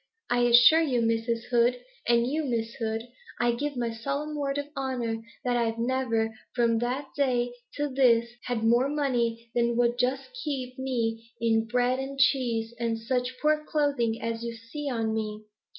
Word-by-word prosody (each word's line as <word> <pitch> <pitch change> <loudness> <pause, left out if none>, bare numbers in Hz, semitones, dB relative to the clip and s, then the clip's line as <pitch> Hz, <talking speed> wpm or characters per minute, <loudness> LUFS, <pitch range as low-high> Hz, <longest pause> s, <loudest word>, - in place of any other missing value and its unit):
I 245 - +3
assure 240 +7 +7
you, 265 -7 +1
Mrs. 230 0 0
Hood, 240 +1 +3 0.3
and 235 0 +4
to 255 - -2
you, 310 +2 0
Miss 230 -4 -2
Hood, 225 -2 -2 0.4
I 240 0 +3
give 285 +3 -3
my 235 -1 -1
solemn 280 +6 -3
word 280 -1 -1
of 285 - -2
honour, 245 -4 -2 0.2
that 245 -1 +1
I've 230 -1 0
never 230 -2 0 0.2
from 230 -2 +3
that 255 +4 -2
day 245 -4 +1 0.2
to 290 0 0
this 240 -4 +3
had 240 -3 -2
more 240 +4 +4
money 235 -5 -1
than 235 0 +1
would 240 0 +2
just 265 - -1
keep 260 -3 -4
me 230 -3 -2
in 225 -1 +2
bread 250 +2 +1
and 270 +1 -5
cheese 245 -4 +2
and 230 -1 0
such 250 +2 -2
poor 305 0 +2
clothing 280 -8 0
as 230 0 -2
this - - -6
you 235 0 -3
see 255 +6 -6
on 225 -3 -1
me. 215 -1 -3
240 Hz, 180 wpm, -27 LUFS, 230-265 Hz, 0.4 s, assure